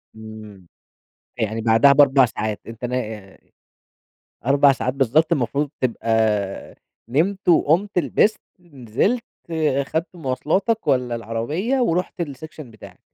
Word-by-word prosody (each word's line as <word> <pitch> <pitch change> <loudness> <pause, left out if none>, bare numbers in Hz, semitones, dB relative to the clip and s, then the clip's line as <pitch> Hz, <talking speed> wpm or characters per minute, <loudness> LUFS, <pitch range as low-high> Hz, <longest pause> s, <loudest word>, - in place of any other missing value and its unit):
امم. 110 -4 -12 0.7
يعني 110 0 -2
بعدها 115 +5 +5
ب4 140 -1 +5
ساعات 110 -2 -4
أنت 115 +2 -9
نا 110 -6 -5 1.1
4 140 +1 +5
ساعات 130 -1 -2
بالضبط 140 +5 +2
المفروض 140 0 0
تبقى 110 -5 -1 0.3
نمت 180 +9 0
وقمت 175 +4 +3
لبست، 190 - +1 0.2
نزلت، 170 - -2 0.3
اخذت 155 +1 -1
مواصلاتك 170 - -1
والّا 125 -2 +1
العربية 120 - -2
ورُحت 180 -5 -1
الsection 155 0 -7
بتاعك. 115 -7 -14
135 Hz, 105 wpm, -21 LUFS, 115-160 Hz, 1.1 s, بعدها